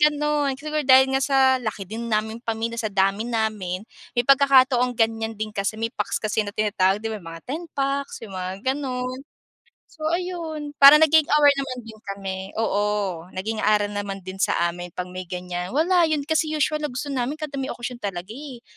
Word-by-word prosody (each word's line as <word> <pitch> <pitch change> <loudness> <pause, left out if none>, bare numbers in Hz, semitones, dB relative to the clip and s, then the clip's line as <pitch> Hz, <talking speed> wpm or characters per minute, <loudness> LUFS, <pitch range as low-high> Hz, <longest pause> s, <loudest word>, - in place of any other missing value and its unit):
ganon. 300 -1 +2
Siguro 305 +2 -2
dahil 265 0 +6
nga 270 - +2
sa 270 0 +2 0.2
laki 215 -4 -4
din 225 +5 -6
naming 220 +1 -1
pamilya, 230 0 -3
sa 220 - -1
dami 195 +2 +1
namin, 215 -5 -2 0.3
may 240 - +2
pagkakataong 260 -2 +5
ganyan 225 0 0
din 215 0 -4
kasi, 200 +2 -2
may 230 +2 -2
packs - - -2
kasi 215 +1 0
na 205 -1 -4
tinatawag 205 -1 +1
'di 225 - -1
ba, 215 - -5
mga 165 -1 -9
ten 305 +7 -4
packs, 275 -2 -2
yung 200 - -10
mga 185 +2 -5
ganon. 255 -2 -4 0.7
So, 310 -1 -6
ayon, 335 -3 -3
parang 285 +3 +9
naging 315 -1 +5
aware 295 0 +5
naman 270 -2 -3
din 220 -1 -12 0.2
kami, 195 -1 -5 0.2
oo, 205 -5 -1
naging 215 +4 -3
aral 210 -1 +2
naman 200 -2 -4
din 185 +1 -8
sa 190 - +2 0.2
amin, 175 0 -9
'pag 180 0 -5
may 185 0 -7
ganyan. 180 +3 -5
Wala, 340 +2 +4
'yon 305 -2 0
kasi 315 +1 +1
usual 305 +1 +1
na 300 - -2
gusto 280 +2 -5
namin 260 +2 -1
kada 300 -3 -6
may 265 - -2
okasyon 240 0 -6
talaga 195 -2 -5
eh. 260 -1 -9
230 Hz, 190 wpm, -23 LUFS, 205-280 Hz, 0.7 s, parang